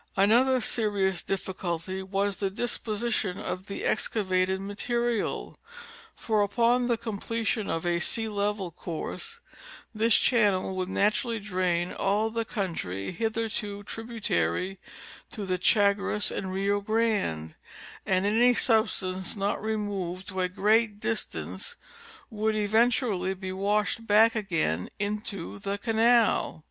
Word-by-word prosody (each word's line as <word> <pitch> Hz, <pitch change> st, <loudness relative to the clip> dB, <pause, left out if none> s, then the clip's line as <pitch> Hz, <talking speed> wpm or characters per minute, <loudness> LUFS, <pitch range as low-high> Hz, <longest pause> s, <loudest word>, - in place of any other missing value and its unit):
Another 245 Hz, +6 st, +5 dB
serious 200 Hz, -5 st, +1 dB
difficulty 190 Hz, -1 st, -3 dB
was 195 Hz, +1 st, -1 dB
the 195 Hz, -2 st, -1 dB
disposition 215 Hz, -2 st, -1 dB
of 185 Hz, +2 st, -5 dB
the 200 Hz, -, -5 dB
excavated 190 Hz, -3 st, +1 dB
material, 235 Hz, +3 st, -2 dB, 0.6 s
for 215 Hz, -2 st, 0 dB
upon 235 Hz, +4 st, +2 dB
the 235 Hz, -2 st, +2 dB
completion 225 Hz, -1 st, -2 dB
of 165 Hz, +1 st, -2 dB
a 175 Hz, 0 st, +1 dB
sea 225 Hz, +5 st, +1 dB
level 205 Hz, -3 st, -1 dB
course 165 Hz, 0 st, -6 dB, 0.5 s
this 225 Hz, 0 st, +4 dB
chan 215 Hz, -5 st, +4 dB
nel 185 Hz, 0 st, -2 dB
would 185 Hz, 0 st, -2 dB
naturally 215 Hz, +4 st, +1 dB
drain 180 Hz, -3 st, -1 dB
all 210 Hz, +3 st, +1 dB
the 230 Hz, 0 st, -1 dB
country 165 Hz, -, -3 dB
hitherto 215 Hz, 0 st, -2 dB
ti'ibutary 195 Hz, -, -2 dB, 0.5 s
to 210 Hz, -3 st, -6 dB
the 185 Hz, -1 st, -1 dB
Chagres 205 Hz, 0 st, +3 dB
and 190 Hz, -1 st, -4 dB
Rio 200 Hz, +2 st, 0 dB
Grande, 205 Hz, -, 0 dB, 0.5 s
and 185 Hz, 0 st, +1 dB
any 240 Hz, +4 st, +4 dB
substance 190 Hz, -6 st, +1 dB
not 200 Hz, 0 st, -1 dB
removed 200 Hz, -4 st, -3 dB
to 190 Hz, -1 st, -2 dB
a 180 Hz, -, +1 dB
great 210 Hz, +2 st, +2 dB
distance 220 Hz, 0 st, -3 dB, 0.6 s
would 215 Hz, 0 st, 0 dB
eventually 215 Hz, -3 st, +2 dB
be 185 Hz, 0 st, -5 dB
washed 210 Hz, +3 st, 0 dB
back 220 Hz, +2 st, +6 dB
again 165 Hz, -, -1 dB
into 205 Hz, -, -4 dB
the 200 Hz, -, -3 dB
canal. 225 Hz, -3 st, +3 dB
205 Hz, 120 wpm, -28 LUFS, 190-225 Hz, 0.6 s, back